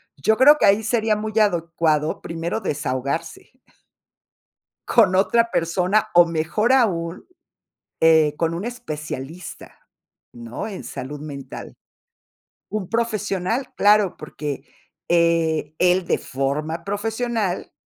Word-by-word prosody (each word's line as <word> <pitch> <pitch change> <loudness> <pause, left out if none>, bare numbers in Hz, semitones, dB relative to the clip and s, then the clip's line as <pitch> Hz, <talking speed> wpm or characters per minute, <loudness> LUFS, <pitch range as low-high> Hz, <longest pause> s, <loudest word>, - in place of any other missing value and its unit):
Yo 220 +11 +1
creo 290 +4 +7
que - - +4
ahí 205 +3 +4
sería 220 -1 +1
muy 215 0 -4
adecuado, 165 -5 +1
primero 165 +6 -4
desahogarse. 145 0 -3 1.4
Con 205 -6 +4
otra 230 +4 +3
persona, 180 +4 +1
o 175 0 +7
mejor 170 +9 0
aún, 175 -8 0 0.7
eh, 160 -2 +4
con 165 0 0
un 175 - -4
especialista, 155 - -7 0.4
¿no? 120 - -7
En 195 -4 -7
salud 145 +3 -6
mental. 140 -3 -8 1.0
Un 200 -3 -4
profesional, 225 0 -1
claro, 205 -3 +4
porque, 150 -2 -6 0.5
eh, 165 -3 +2
él 180 0 +3
de - - 0
forma 150 +5 -3
profesional 220 -1 -2
175 Hz, 110 wpm, -22 LUFS, 155-215 Hz, 1.4 s, creo